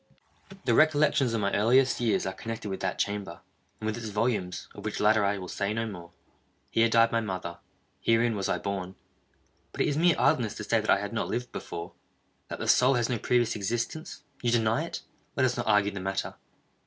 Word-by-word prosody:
The 120 Hz, -, +3 dB
recollections 145 Hz, -4 st, +3 dB
of 110 Hz, -, 0 dB
my 100 Hz, 0 st, 0 dB
earliest 125 Hz, +6 st, +3 dB
years 115 Hz, -3 st, +1 dB
are 95 Hz, -, -2 dB
connected 110 Hz, +1 st, -6 dB
with 95 Hz, -, -4 dB
that 95 Hz, -1 st, -2 dB
chamber, 100 Hz, -4 st, -3 dB, 0.4 s
and -, -, -6 dB
with 110 Hz, 0 st, -1 dB
its 115 Hz, -1 st, -5 dB
volumes—of 105 Hz, -4 st, -2 dB
which -, -, -3 dB
latter 105 Hz, 0 st, +4 dB
I 100 Hz, 0 st, +1 dB
will 90 Hz, -1 st, -7 dB
say 100 Hz, +3 st, -2 dB
no 115 Hz, 0 st, -1 dB
more. 90 Hz, -6 st, -8 dB, 0.6 s
Here 115 Hz, 0 st, +3 dB
died 115 Hz, 0 st, +4 dB
my 115 Hz, -, +1 dB
mother. 90 Hz, -5 st, -5 dB, 0.4 s
Herein 115 Hz, 0 st, +2 dB
was 100 Hz, -2 st, -2 dB
I -, -, +1 dB
born. 95 Hz, -2 st, -4 dB, 0.8 s
But -, -, -4 dB
it -, -, +3 dB
is 145 Hz, -1 st, 0 dB
mere 170 Hz, +1 st, +4 dB
idleness 115 Hz, -4 st, +2 dB
to 105 Hz, -, -6 dB
say 115 Hz, +1 st, +2 dB
that 110 Hz, -, -6 dB
I -, -, +6 dB
had 105 Hz, +3 st, -5 dB
not 115 Hz, -, -1 dB
lived 125 Hz, 0 st, -3 dB
before—that 85 Hz, +1 st, -9 dB
the -, -, -4 dB
soul 130 Hz, +2 st, +5 dB
has 120 Hz, -1 st, 0 dB
no 120 Hz, -3 st, -1 dB
previous 120 Hz, -1 st, +1 dB
existence. 120 Hz, +9 st, -3 dB, 0.2 s
You 120 Hz, -, +1 dB
deny 115 Hz, +5 st, +2 dB
it?—let 155 Hz, -5 st, -4 dB
us 125 Hz, -1 st, +1 dB
not -, -, -3 dB
argue 105 Hz, -1 st, +3 dB
the 100 Hz, -, -6 dB
matter. 95 Hz, +1 st, -3 dB
110 Hz, 205 wpm, -28 LUFS, 100-120 Hz, 0.8 s, I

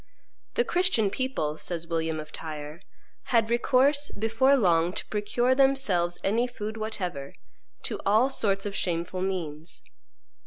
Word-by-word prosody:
"The 475 Hz, -, +3 dB
Christian 355 Hz, -, +2 dB
people," 195 Hz, -, -2 dB
says 170 Hz, -2 st, -3 dB
William 160 Hz, -1 st, -2 dB
of 155 Hz, -1 st, -8 dB
Tyre, 155 Hz, +1 st, -7 dB, 0.4 s
"had 230 Hz, -2 st, +2 dB
recourse 270 Hz, +4 st, +3 dB
before 225 Hz, +6 st, +2 dB
long, 175 Hz, -5 st, +3 dB
to -, -, -3 dB
procure 240 Hz, +4 st, +1 dB
themselves 260 Hz, -11 st, +2 dB
any 230 Hz, +5 st, +2 dB
food 220 Hz, -3 st, -6 dB
whatever, 180 Hz, -11 st, -4 dB, 0.5 s
to -, -, -2 dB
all 220 Hz, +7 st, +3 dB
sorts 195 Hz, -6 st, +1 dB
of 205 Hz, -, -3 dB
shameful 175 Hz, +1 st, -2 dB
means. 170 Hz, -4 st, -4 dB
200 Hz, 130 wpm, -27 LUFS, 170-245 Hz, 0.5 s, The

